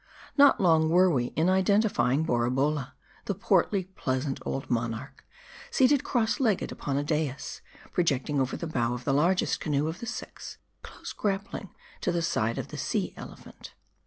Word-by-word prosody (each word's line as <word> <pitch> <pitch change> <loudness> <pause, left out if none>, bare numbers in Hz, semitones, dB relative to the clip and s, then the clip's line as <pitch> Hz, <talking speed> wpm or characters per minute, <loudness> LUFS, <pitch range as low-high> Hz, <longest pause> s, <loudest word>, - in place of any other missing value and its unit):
Not 285 -1 +6
long 160 -4 +4
were 180 +2 +5
we 125 -5 +1
in 160 +2 +2
identifying 190 - +2
Borabolla: 130 +3 0 0.3
the 200 - -2
portly, 195 0 +2
pleasant 135 -7 -3
old 135 +1 -3
monarch, 115 -2 -3 0.5
seated 265 +1 +3
cross. 235 0 0
legged 220 -8 +1
upon 140 -1 -3
a 145 - 0
dais, 150 -2 -2 0.3
pro 180 - +1
jecting 145 -2 0
over 130 -1 -1
the - - -5
bow 120 -6 -1
of 125 - -7
the 135 - +1
largest 175 +6 +2
canoe 150 -1 0
of 160 +2 -4
the 235 - -6
six, 240 - -7 0.2
close - - -9
grappling 200 -1 -3 0.3
to - - 0
the 170 -1 -1
side 115 -8 0
of - - -4
the - - -7
Sea - - -1
Elephant. - - -11
160 Hz, 165 wpm, -28 LUFS, 135-190 Hz, 0.5 s, Not